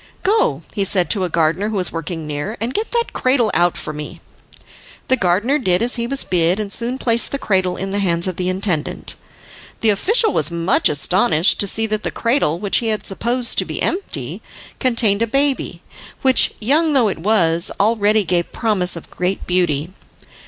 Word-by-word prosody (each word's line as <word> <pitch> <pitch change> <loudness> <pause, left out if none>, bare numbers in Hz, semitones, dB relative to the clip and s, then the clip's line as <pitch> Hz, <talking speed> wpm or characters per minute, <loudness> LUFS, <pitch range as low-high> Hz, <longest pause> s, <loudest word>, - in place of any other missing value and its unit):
"Go," 360 - +1
he 200 - 0
said 185 -2 +1
to 195 -4 +1
a - - -4
gardener 170 +5 0
who 220 - -4
was 185 -3 +1
working 165 0 -5
near, 150 +9 -5
"and 230 +4 -3
get 430 +2 -2
that 470 0 -2
cradle 255 -4 +1
out 175 0 +1
for 155 - -5
me." 150 0 -8 0.9
The 260 - +5
gardener 210 +8 +1
did 185 -3 +2
as 245 - -1
he 235 0 -2
was 275 +2 0
bid, 180 +2 +1
and 205 -2 -2
soon 240 +2 -1
placed 235 -3 +1
the 280 - -3
cradle 185 -7 0
in 195 0 -4
the 200 - -1
hands 170 -2 0
of 185 - -4
the 180 0 -1
intendant. 185 -4 -2 0.7
The 220 - +4
official 435 - +2
was 155 - +2
much 170 +1 +1
astonished 165 - +2
to 200 - +3
see 225 +3 +2
that 215 -1 -2
the - - -2
cradle, 230 - 0
which 200 +2 0
he 230 - -1
had 215 -1 -2
supposed 235 +5 0
to - - 0
be - - -5
empty, 385 +2 -3 0.4
contained 230 -5 +1
a 230 - +1
baby, 275 +3 -1 0.4
which, 260 -2 +4
young 300 +8 +2
though 255 -5 +3
it 195 - -3
was, 170 -3 +2
already 215 0 +2
gave 175 -2 -1
promise 200 -6 0
of 170 - -11
great 180 +2 -3
beauty. 175 -2 0
200 Hz, 195 wpm, -18 LUFS, 175-235 Hz, 0.9 s, The